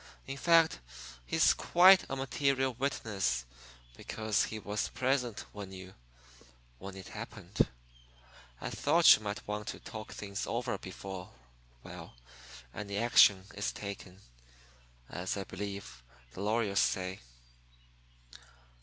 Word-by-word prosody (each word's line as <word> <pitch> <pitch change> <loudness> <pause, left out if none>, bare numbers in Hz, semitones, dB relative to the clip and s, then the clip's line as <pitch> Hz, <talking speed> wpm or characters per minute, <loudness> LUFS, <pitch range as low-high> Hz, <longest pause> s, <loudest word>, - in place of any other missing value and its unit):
In 135 - -5
fact, 165 +1 +4 0.5
he's - - +4
quite 185 +2 +6
a - - -2
material 135 0 0
witness 110 - -1 0.5
because 110 - -1
he 110 - -5
was 105 0 -2
present 125 -4 0
when 100 -2 -7
you 95 0 -10 0.9
when 95 0 -8
it 95 - -9
happened. - - -2 0.9
I - - -5
thought 165 +3 +6
you - - -7
might 105 -1 -5
want 105 0 -4
to - - -5
talk 110 -1 -8
things 100 -1 -5
over - - -2
before 95 -2 -7 0.5
well, - - -10 0.5
before - - -8
any 100 -1 -4
action 105 -4 +6
is 100 - -2
taken, 100 -2 -8 0.9
as 90 +2 -3
I 100 - -2
believe 100 -9 -7 0.3
the 95 - -7
lawyers 105 -1 +1
say." 95 0 0
105 Hz, 120 wpm, -32 LUFS, 95-125 Hz, 0.9 s, quite